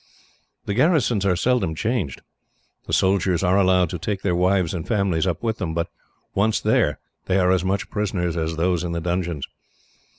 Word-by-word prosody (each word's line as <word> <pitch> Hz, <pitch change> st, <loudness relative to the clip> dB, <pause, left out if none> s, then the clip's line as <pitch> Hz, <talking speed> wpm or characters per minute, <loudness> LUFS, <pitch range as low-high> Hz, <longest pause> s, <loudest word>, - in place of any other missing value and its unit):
The 100 Hz, -, -2 dB
garrisons 125 Hz, -, +2 dB
are 90 Hz, -, +3 dB
seldom 95 Hz, -5 st, +1 dB
changed. 105 Hz, -, -2 dB, 0.6 s
The -, -, -6 dB
soldiers 95 Hz, -2 st, +2 dB
are 95 Hz, +2 st, +3 dB
allowed 90 Hz, -3 st, +3 dB
to 90 Hz, -, -4 dB
take 100 Hz, +3 st, -3 dB
their 95 Hz, -, +1 dB
wives 90 Hz, -1 st, +2 dB
and 85 Hz, -4 st, -5 dB
families 95 Hz, -5 st, +1 dB
up 85 Hz, +2 st, -2 dB
with 110 Hz, -1 st, -1 dB
them, 80 Hz, -5 st, -3 dB
but 85 Hz, 0 st, -1 dB, 0.4 s
once 105 Hz, +3 st, +2 dB
there, -, -, +2 dB, 0.3 s
they 95 Hz, -, +2 dB
are 90 Hz, -1 st, +3 dB
as 95 Hz, -2 st, +2 dB
much 95 Hz, +1 st, -2 dB
prisoners 95 Hz, -5 st, -1 dB
as 80 Hz, -1 st, -2 dB
those 85 Hz, +1 st, 0 dB
in 85 Hz, -1 st, -3 dB
the 85 Hz, -, -1 dB
dungeons. 85 Hz, -4 st, -2 dB
95 Hz, 185 wpm, -23 LUFS, 85-100 Hz, 0.6 s, are